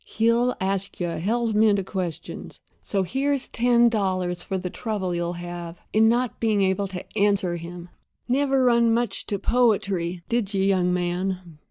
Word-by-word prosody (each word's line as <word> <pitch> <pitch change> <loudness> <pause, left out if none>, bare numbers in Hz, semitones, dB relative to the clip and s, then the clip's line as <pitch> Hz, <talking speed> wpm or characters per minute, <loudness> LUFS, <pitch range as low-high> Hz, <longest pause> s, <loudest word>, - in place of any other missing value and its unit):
He'll 230 +2 +1
ask 195 0 -2
you 175 -1 -1
a - - -4
hell's 225 +5 0
mint 210 -1 +4
of 195 - -2
questions; 185 -5 -5 0.2
so 195 -2 -1
here's 275 +6 -1
ten 240 0 +4
dollars 185 -5 0
for 190 - -3
the 180 -1 -4
trouble 205 -6 -3
you'll 175 0 -2
have 175 -1 -7 0.2
in 220 +1 +5
not 245 +1 0
being 215 -3 +2
able 190 +1 +1
to 185 -2 -7
answer 200 -3 +2
'em. 175 +1 -8 0.4
Never 270 +1 +2
run 235 -2 +4
much 240 0 -2
to 205 - -1
poetry, 195 -7 +1
did 220 -4 -1
you, 190 - +2
young 185 -2 +2
man?" 180 -2 -2
195 Hz, 170 wpm, -24 LUFS, 180-230 Hz, 0.4 s, in